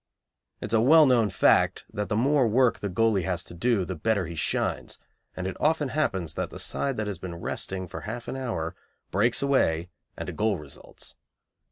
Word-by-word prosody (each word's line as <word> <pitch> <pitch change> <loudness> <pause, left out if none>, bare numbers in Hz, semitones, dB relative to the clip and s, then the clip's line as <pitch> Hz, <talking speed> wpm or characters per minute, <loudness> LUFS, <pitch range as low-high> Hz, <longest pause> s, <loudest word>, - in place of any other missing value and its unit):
It - - -3
is - - -4
a 110 - +4
well 155 +6 +7
known 120 -5 +3
fact 90 -3 +3
that 105 0 -3
the - - 0
more 135 +2 +3
work 125 +2 +3
the 100 - -3
goalie 105 +1 +2
has 90 -2 -2
to - - -10
do 105 +1 +1
the 95 - -4
better 100 +3 0
he 85 - -7
shines, 80 - -2 0.4
and 90 - -4
it 95 - -3
often 150 -2 +1
happens 95 - -1
that - - -3
the - - -9
side 135 -2 -2
that 105 - -1
has 100 -5 -4
been 90 -2 -6
resting 95 +2 -4
for - - -7
half 120 +2 -6
an - - -4
hour 115 -12 -3 0.4
breaks 115 +7 +2
away 90 -11 +1 0.3
and - - -5
a - - -4
goal 105 -2 0
results. 75 -3 -12
105 Hz, 205 wpm, -26 LUFS, 90-125 Hz, 0.4 s, well